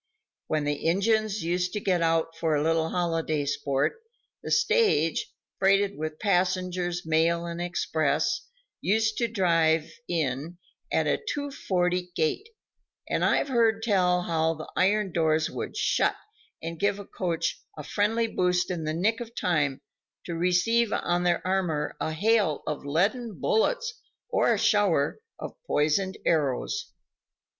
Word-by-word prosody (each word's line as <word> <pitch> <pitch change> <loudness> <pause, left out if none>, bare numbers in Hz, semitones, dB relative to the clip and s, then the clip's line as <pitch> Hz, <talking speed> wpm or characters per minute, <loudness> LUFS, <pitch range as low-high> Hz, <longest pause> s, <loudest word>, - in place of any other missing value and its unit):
When 155 -1 0
the 145 0 -2
Injuns 215 +2 +1
used 180 +2 -1
to 210 - -1
get 185 -4 +1
out 165 0 +1
for 160 -2 0
a 145 - +1
little 165 0 +1
holiday 165 -4 -1
sport, 140 - -1 0.4
the - - -6
stage, 450 - +2 0.3
freighted 195 +1 +3
with 155 0 -5
passengers, 180 -2 0
mail 165 +2 +2
and 170 0 -5
express, 175 - 0 0.3
used 220 +2 +1
to 235 - +2
drive 165 -7 +2 0.2
in 160 0 -2 0.3
at - - +2
a - - 0
two 285 -1 -3
forty 180 -6 -1
gait; 285 - -1 0.6
and - - 0
I've 280 - +2
heard 225 -3 +2
tell 180 -5 +2
how 165 -1 0
the 155 - -9
iron 200 +1 +2
doors 160 -1 +1
would - - -5
shut - - +2 0.5
and 165 0 -5
give 200 0 +1
the 200 - -8
coach 175 -4 -2 0.2
a 150 - -6
friendly 215 +8 +1
boost 180 -4 0
in 165 -3 -3
the 155 +1 -2
nick 215 +7 +1
of 235 -1 -8
time 150 -6 0 0.4
to 175 - -4
receive 180 +7 +2
on 175 0 0
their 175 -1 +1
armor 180 -6 -1
a 160 - -2
hail 200 -2 +1
of 150 -2 -4
leaden 195 - 0
bullets 470 - 0 0.3
or - - +2
a - - +2
shower 195 -9 +2 0.2
of - - -7
poisoned 170 +6 +1
arrows. 155 - 0
180 Hz, 145 wpm, -27 LUFS, 160-205 Hz, 0.6 s, freighted